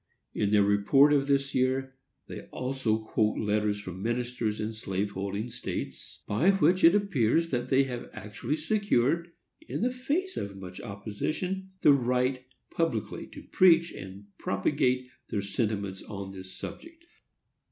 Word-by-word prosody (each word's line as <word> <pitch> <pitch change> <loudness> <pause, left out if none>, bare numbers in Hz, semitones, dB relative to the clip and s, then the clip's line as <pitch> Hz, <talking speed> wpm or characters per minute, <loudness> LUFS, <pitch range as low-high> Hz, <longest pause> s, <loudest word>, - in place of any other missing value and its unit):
In 100 - 0
their 105 -1 +5
report 105 +9 +5
of 140 -1 +2
this 140 -1 +1
year 130 +1 +1 0.3
they - - -8
also 125 -4 -1
quote 110 -1 0
letters 105 0 0
from 95 -2 -7
ministers 120 -1 -1
in 110 +1 -2
slave 100 -2 -2
holding 100 +3 -3
states, 120 +1 -6
by 125 - +2
which 185 -1 +3
it 170 +4 +8
appears 165 - +2
that 125 -2 -2
they 135 +1 +5
have 125 -3 -5
actually 105 +7 -4
secured, 170 - +1 0.4
in - - -2
the 250 +1 +1
face 300 +10 -2
of 100 -1 -4
much 90 -1 -8
opposition, 155 - -4
the 145 - +7
right 125 0 +1 0.3
publicly 165 -11 -2
to - - -11
preach 170 -2 +5
and 95 +1 -9
propagate 125 +5 +1 0.2
their 100 -2 -1
sentiments 100 -2 -2
upon 100 -2 -7
this 95 -1 -9
subject. 330 +1 -9
125 Hz, 145 wpm, -29 LUFS, 105-150 Hz, 0.4 s, it